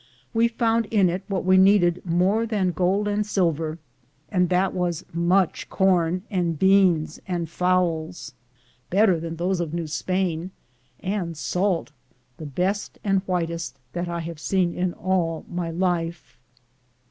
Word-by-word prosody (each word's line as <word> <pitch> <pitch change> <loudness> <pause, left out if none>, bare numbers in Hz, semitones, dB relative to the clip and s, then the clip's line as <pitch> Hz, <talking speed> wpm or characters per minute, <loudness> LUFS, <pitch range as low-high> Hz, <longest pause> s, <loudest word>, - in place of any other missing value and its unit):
We 230 +1 +4
found 230 -1 +1
in 200 -5 +3
it 180 +2 -3
what 195 -4 -2
we 185 0 +5
needed 185 -2 +4
more 185 +6 +1
than 200 -5 0
gold 190 +4 +1
and 205 0 +1
sil 185 -5 +3
ver, 155 +1 -4 0.5
and 180 -3 +2
that 185 +1 +2
was 175 -3 -2
much 175 +2 +1
corn 180 -2 +2
and 175 -4 0
beans 185 -4 +3
and 175 -3 -2
fowls, 175 -3 -1 0.6
better 190 -2 +3
than 165 0 -5
those 180 +2 -1
of 170 -2 -3
New 170 -1 -2
Spain, 175 +2 -2 0.5
and 185 -4 -3
salt, 180 +1 -1 0.5
the 155 - -7
best 185 +8 -2
and 195 -2 +2
whitest 170 -6 -2 0.2
that 175 0 -3
I 170 0 -3
have 165 -1 -7
seen 180 +1 +1
in 180 -1 -1
all 175 -3 -1
my 175 -1 -3
life. 170 -1 -2
180 Hz, 145 wpm, -24 LUFS, 170-190 Hz, 0.6 s, we